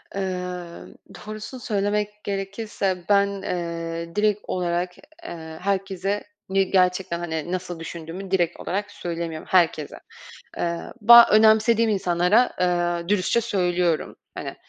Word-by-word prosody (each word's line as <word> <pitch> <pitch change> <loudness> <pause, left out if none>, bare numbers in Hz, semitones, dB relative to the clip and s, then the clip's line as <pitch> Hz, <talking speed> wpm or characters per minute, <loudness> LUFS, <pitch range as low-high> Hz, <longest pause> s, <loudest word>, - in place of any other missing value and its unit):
Eee, 195 - -1 0.9
doğrusunu 215 +4 -8
söylemek 210 -1 -2
gerekirse, 195 -2 -3
ben, 200 -1 +3
eee, 170 -2 -4
direkt 210 0 +2
olarak, 180 0 -2
eee, 165 - -10
herkese 195 0 -1 0.3
ni 195 0 +1
gerçekten 180 -2 +2
hani 160 -1 -4
nasıl 180 -2 -4
düşündüğümü 170 +3 -7
direkt 175 -3 +1
olarak 205 +3 -3
söylemiyorum 165 -2 -5
herkese. 165 -5 +2 0.6
Eee, 170 -1 -1 0.2
ba 235 +2 +10
önemsediğim 220 +1 +5
insanlara, 190 +4 +2
eee, 175 -1 0
dürüstçe 210 +3 +2
söylüyorum. 180 -6 0 0.2
Hani - - -6
185 Hz, 110 wpm, -24 LUFS, 170-205 Hz, 0.9 s, ba